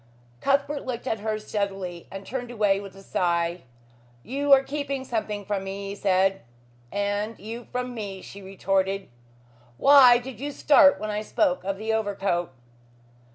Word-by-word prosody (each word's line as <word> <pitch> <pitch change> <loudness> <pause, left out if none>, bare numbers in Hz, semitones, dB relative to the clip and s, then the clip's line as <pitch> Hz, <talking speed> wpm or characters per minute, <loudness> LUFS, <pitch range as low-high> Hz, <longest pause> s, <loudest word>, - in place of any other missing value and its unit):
Cuthbert 280 - +1
looked 250 -2 -5
at 225 -4 -1
her 215 +1 -2
steadily 195 -5 -4
and 195 0 -8
turned 245 +1 -5
away 210 -4 +2
with 200 -1 -10
a 195 - -13
sigh. 170 -1 0 0.6
"You 280 +4 -2
are 270 -1 +8
keeping 275 -1 -3
something 215 -4 -3
from 200 -1 -2
me," 195 +1 -5
he 200 - -5
said. 195 -1 +2 0.5
"And 205 +2 -2
you 225 +4 -8
from 250 0 -3
me," 200 -4 -6
she 200 - -10
retorted. 195 0 -1 0.7
"Why 270 - +8
did 245 -2 -8
you 290 +2 -4
start 285 0 +5
when 215 0 -3
I 210 0 -2
spoke 270 +4 0
of 195 0 -2
the 220 +2 -2
overcoat?" 195 -6 -1
210 Hz, 155 wpm, -25 LUFS, 195-250 Hz, 0.7 s, are